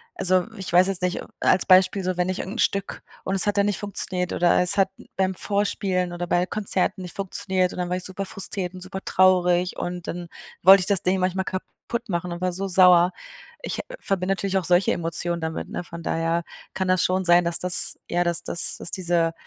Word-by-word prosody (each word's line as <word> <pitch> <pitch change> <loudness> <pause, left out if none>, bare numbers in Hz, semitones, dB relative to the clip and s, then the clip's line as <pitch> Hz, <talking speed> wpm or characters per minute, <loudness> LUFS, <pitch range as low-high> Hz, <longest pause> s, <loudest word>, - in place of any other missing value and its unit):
also, 185 -1 +2
ich 190 -2 -6
weiß 180 +2 +5
jetzt 195 -2 -1
nicht 180 0 -1 0.2
als 185 - +3
Beispiel 190 +1 +4
so, 185 -1 -2
wenn 180 +1 0
ich 185 - -2
irgend 195 +4 -5
'n - - -6
Stück 200 0 -1 0.2
und 195 - -2
es 190 - +3
hat 205 - 0
dann 200 - +3
nicht 205 -2 -1
funktioniert, 185 -3 -2
oder 175 0 +3
es 180 +2 +2
hat 195 -1 +3 0.3
beim 190 0 +1
Vorspielen 195 -3 -1
oder 175 0 -4
bei 175 +1 +1
Konzerten 195 -1 -1
nicht 180 -2 -8
funktioniert, 190 -1 -1
und - - -7
dann 180 -1 -2
war 180 - -1
ich 185 - -5
super 190 +1 -4
frustriert 190 -1 -4
und 185 - -9
super 190 +1 -6
traurig 180 -1 +3
und 175 -1 -5
dann 175 0 -5 0.3
wollte 190 +1 +8
ich 185 - -2
das 200 -3 +2
Ding 185 +1 +1
manchmal 185 +1 -1
kaputt 230 +5 -6
machen 175 -1 -2
und 175 - -6
war 185 -1 -1
so 195 +2 -2
sauer. 180 -1 +5 0.5
Ich, - - -4
äh, - - -3 0.2
verbinde 190 -1 -1
natürlich 195 0 -1
auch 180 - -6
solche 180 +2 +3
Emotionen 170 0 0
damit, 160 0 -4
ne? - - -5
Von 170 -1 -10
daher 165 +1 -1 0.3
kann 190 0 -1
das 185 0 +2
schon 185 +1 0
sein, 175 0 +5
dass 170 0 0
das 180 -1 0
ja, 175 +1 +1
dass 170 -1 -1
das 170 - -1
das - - -1
diese 170 -2 0
185 Hz, 225 wpm, -24 LUFS, 175-190 Hz, 0.5 s, wollte